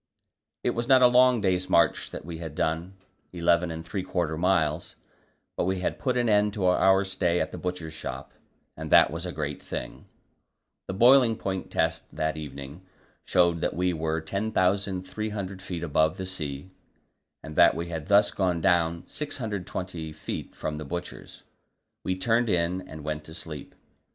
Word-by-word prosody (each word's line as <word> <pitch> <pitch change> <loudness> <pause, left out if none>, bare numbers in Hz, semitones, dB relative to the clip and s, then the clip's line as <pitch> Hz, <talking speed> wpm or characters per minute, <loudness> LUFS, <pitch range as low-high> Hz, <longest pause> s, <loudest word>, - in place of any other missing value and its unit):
It - - +2
was 120 0 -3
not 130 -1 +6
a - - +9
long 125 -1 +5
day's 95 -2 +1
march 85 - +3
that - - -8
we 85 -1 -7
had 80 -3 -7
done 80 +5 -1 0.4
eleven 85 0 +2
and 80 0 -6
three 95 +3 -3
quarter 85 -4 -1
miles 80 -2 0 0.6
but - - 0
we 95 0 -1
had - - -2
put 125 -2 0
an 120 -1 +2
end 105 -1 +3
to 100 -3 -1
our 95 +1 +4
stay 90 -2 0
at - - -1
the - - -7
Butcher's 90 -3 -4
Shop, 80 - -7 0.4
and - - -7
that - - +7
was 85 +3 -4
a - - -4
great 75 -3 -4
thing. - - -6 0.8
The 95 - -4
boiling 120 +1 +6
point 95 -3 -4
test - - -1
that 80 0 -1
evening 70 +1 -8 0.4
showed 85 -2 +3
that - - -1
we 90 +1 +1
were 80 0 -1
10,300 100 +1 -1
feet 90 -3 -5
above 80 0 +2
the 95 - -4
sea, 80 -2 -4 0.7
and 80 -1 -8
that - - +6
we 85 +1 -4
had 80 -2 -5
thus 100 +1 +5
gone 90 -3 0
down 85 0 +2
620 95 - -5
feet 75 - -6
from 75 0 -4
the - - -5
Butcher's. 85 +4 -7 0.6
We 95 - -1
turned 115 +4 +2
in 90 0 +1
and 80 -1 -9
went 75 0 -3
to 80 - -9
sleep. 75 -4 -7
90 Hz, 170 wpm, -27 LUFS, 80-95 Hz, 0.8 s, a